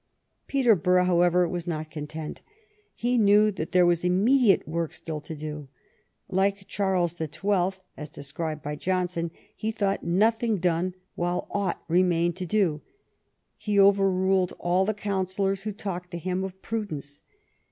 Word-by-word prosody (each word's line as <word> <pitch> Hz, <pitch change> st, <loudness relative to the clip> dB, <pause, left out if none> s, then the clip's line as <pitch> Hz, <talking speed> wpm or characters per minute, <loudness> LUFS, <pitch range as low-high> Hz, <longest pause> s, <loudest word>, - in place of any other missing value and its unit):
Peterborough, 200 Hz, -, +3 dB
however, 175 Hz, 0 st, +3 dB
was 175 Hz, 0 st, -4 dB
not 155 Hz, -2 st, -4 dB
content. 155 Hz, 0 st, -6 dB, 0.5 s
He 245 Hz, +1 st, +1 dB
knew 210 Hz, 0 st, +5 dB
that 170 Hz, -5 st, -5 dB
there 180 Hz, -1 st, +5 dB
was 175 Hz, -1 st, +2 dB
immediate 200 Hz, -, +3 dB
work 165 Hz, 0 st, -2 dB
still 155 Hz, -2 st, -5 dB
to 160 Hz, -, -7 dB
do. 150 Hz, -1 st, -6 dB, 0.6 s
Like 195 Hz, +1 st, 0 dB
Charles 185 Hz, -4 st, 0 dB
the 160 Hz, -2 st, -4 dB
Twelfth, 190 Hz, +4 st, -1 dB
as 150 Hz, -1 st, -7 dB
described 155 Hz, +2 st, -5 dB
by 150 Hz, +1 st, -3 dB
Johnson, 180 Hz, -1 st, -1 dB, 0.3 s
he 215 Hz, -, -3 dB
thought 200 Hz, -3 st, -1 dB
nothing 220 Hz, +5 st, +2 dB
done 180 Hz, +1 st, 0 dB, 0.2 s
while 175 Hz, +1 st, -1 dB
aught 200 Hz, -3 st, -2 dB
remained 175 Hz, 0 st, +2 dB
to 185 Hz, -1 st, -4 dB
do. 170 Hz, -6 st, +1 dB, 0.9 s
Ho 210 Hz, -, +1 dB
overruled 190 Hz, -2 st, +3 dB
all 180 Hz, +2 st, +1 dB
the 215 Hz, +1 st, -1 dB
counsellors 195 Hz, -1 st, -1 dB
who 215 Hz, +1 st, -3 dB
talked 185 Hz, -3 st, -5 dB
to 175 Hz, -, -5 dB
him 185 Hz, +2 st, -2 dB
of 190 Hz, 0 st, -6 dB
prudence. 155 Hz, -11 st, -5 dB
180 Hz, 145 wpm, -26 LUFS, 170-200 Hz, 0.9 s, knew